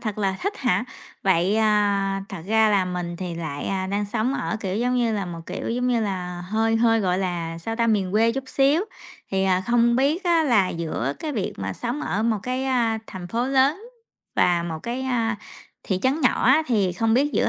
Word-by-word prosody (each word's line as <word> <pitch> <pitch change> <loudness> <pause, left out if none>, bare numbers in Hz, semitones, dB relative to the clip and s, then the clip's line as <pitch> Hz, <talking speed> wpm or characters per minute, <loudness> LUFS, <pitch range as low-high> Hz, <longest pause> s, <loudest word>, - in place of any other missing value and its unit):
thật 215 -2 -4
là 195 -2 0
thích 400 +2 -2
hả? 245 -3 +1 0.4
Vậy, 190 +1 +2
à, 205 -2 +2
thật 190 -5 -7
ra 220 +1 +4
là 200 -3 +3
mình 180 -1 -4
thì 180 -1 -5
lại 170 +4 -3
đang 205 +1 0
sống 235 +4 0
ở, 220 - -2
kiểu 190 -2 -2
giống 245 +3 +1
như 235 -2 +1
là, 200 -3 -2
một, 170 -1 -6
kiểu - - -5
giống 250 +2 0
như 240 -2 +2
là, 180 -4 -3
hơi 225 +2 +1
hơi, 225 0 +3
gọi 185 -2 +1
là, 170 -3 -3
sao 225 +7 -4
ta, 230 0 +2
miền 200 -5 +1
quê 225 +2 +3
chút 270 +2 -4
xíu. 275 +4 +3 0.5
Thì, 190 0 +1
à, 185 -1 +2
không 235 0 +3
biết 295 +8 +1
á, 340 -2 +4
là, 215 -9 +3
giữa 155 -6 -2
cái 310 -2 -4
việc 210 -8 -2
mà 100 0 -3
sống 240 - -4
ở 215 -7 -1
một 225 -2 +1
cái, 255 +1 -2
a, 240 -4 +1
thành 185 -2 -8
phố 235 +6 -1
lớn 270 +6 +3 0.6
và 175 -1 +3
một 165 -2 -4
cái, 240 +2 -3
a, 230 -4 0 0.5
thị 190 - -1
trấn 270 +5 +1
nhỏ - - +2
á, 270 +6 +5
thì 205 -7 +1
không 225 +5 +1
biết 285 +4 +2
giữa - - +2
215 Hz, 220 wpm, -24 LUFS, 185-245 Hz, 0.6 s, á